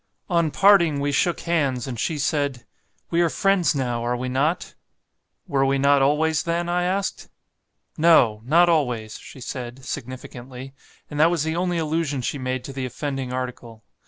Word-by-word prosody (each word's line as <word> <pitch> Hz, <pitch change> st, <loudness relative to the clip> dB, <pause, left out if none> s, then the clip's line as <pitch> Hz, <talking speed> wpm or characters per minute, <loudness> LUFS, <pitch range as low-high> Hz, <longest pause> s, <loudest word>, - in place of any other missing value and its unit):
On 170 Hz, -2 st, +2 dB
parting 170 Hz, -5 st, +4 dB
we 145 Hz, +1 st, 0 dB
shook 170 Hz, +5 st, +1 dB
hands, 140 Hz, -8 st, 0 dB
and 125 Hz, -4 st, -6 dB
she 160 Hz, -, -1 dB
said, 140 Hz, -4 st, -1 dB, 0.5 s
'We 170 Hz, 0 st, +2 dB
are 170 Hz, -, +3 dB
friends 195 Hz, -2 st, +2 dB
now, 120 Hz, -3 st, -1 dB
are 120 Hz, +1 st, -1 dB
we 130 Hz, +1 st, -3 dB
not?' 145 Hz, +7 st, -1 dB, 0.7 s
'Were 135 Hz, -1 st, +1 dB
we 135 Hz, 0 st, +2 dB
not 140 Hz, 0 st, +4 dB
always, 150 Hz, +2 st, +2 dB
then?' 170 Hz, +1 st, -1 dB
I 175 Hz, 0 st, +1 dB
asked. 195 Hz, +2 st, -2 dB, 0.7 s
'No! 125 Hz, -10 st, +5 dB
not 165 Hz, +8 st, +4 dB
always,' 125 Hz, -10 st, 0 dB
she -, -, -12 dB
said, 125 Hz, +1 st, -7 dB
significantly; 130 Hz, +1 st, -8 dB, 0.4 s
and 150 Hz, -, -4 dB
that 160 Hz, +2 st, +6 dB
was 170 Hz, -4 st, 0 dB
the 160 Hz, +1 st, -2 dB
only 175 Hz, 0 st, 0 dB
allusion 155 Hz, -4 st, -1 dB
she 140 Hz, -, -2 dB
made 130 Hz, -1 st, -3 dB
to 135 Hz, -, -8 dB
the 130 Hz, -1 st, -3 dB
offending 135 Hz, 0 st, -4 dB
article. 125 Hz, -3 st, -6 dB
140 Hz, 170 wpm, -23 LUFS, 130-165 Hz, 0.7 s, that